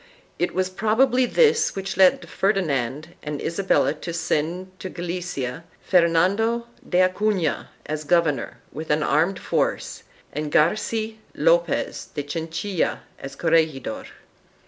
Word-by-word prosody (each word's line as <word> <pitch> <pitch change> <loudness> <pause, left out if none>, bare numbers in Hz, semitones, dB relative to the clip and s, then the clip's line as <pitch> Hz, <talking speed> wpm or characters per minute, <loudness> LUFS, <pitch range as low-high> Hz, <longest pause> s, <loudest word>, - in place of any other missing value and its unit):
It 175 - -1
was 185 0 0
probably 240 +6 +2
this 465 - +3
which 195 0 -4
led 185 0 +4
Ferdinand 155 - 0
and 150 -1 -4
Isabella 170 -6 +1
to 160 +3 -6
send 170 +3 -1
to 185 - -5
Galicia 170 -6 -4 0.2
Fernando 190 +7 +3 0.2
de 180 0 +4
Acufia 185 -4 0 0.2
as 155 0 -3
governor 160 -5 +1
with 155 +4 -7
an 150 0 +2
armed 170 +6 +2
force, - - -1 0.3
and 150 +1 -3
Garci 215 +7 +1 0.2
Lopez - - +1
de 145 - -2
Chinchilla 165 +5 -2 0.2
as 140 0 -8
corregidor. 155 -7 +1
175 Hz, 120 wpm, -23 LUFS, 155-195 Hz, 0.3 s, led